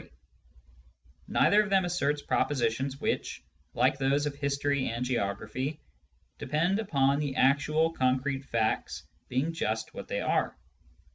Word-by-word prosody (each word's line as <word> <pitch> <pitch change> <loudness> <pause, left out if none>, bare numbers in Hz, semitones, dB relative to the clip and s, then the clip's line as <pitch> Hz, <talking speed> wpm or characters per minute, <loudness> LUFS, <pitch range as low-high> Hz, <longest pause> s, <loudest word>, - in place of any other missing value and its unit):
Neither 210 +1 +4
of 210 - -3
them 190 -2 +3
asserts 150 -4 0
propositions 135 0 0
which, - - -2 0.3
like 130 +3 +2
those 140 +2 +2
of 145 - -2
history 140 -1 -1
and 120 +2 -2
geography, 120 +5 -2 0.6
depend 170 +7 +1
upon 140 -9 +2
the 145 -3 -2
actual 155 +5 +3
concrete 130 0 0
facts 115 -4 -1 0.3
being 135 +6 0
just 110 -8 -2
what - - -8
they - - -2
are. - - 0
140 Hz, 125 wpm, -29 LUFS, 130-150 Hz, 0.6 s, Neither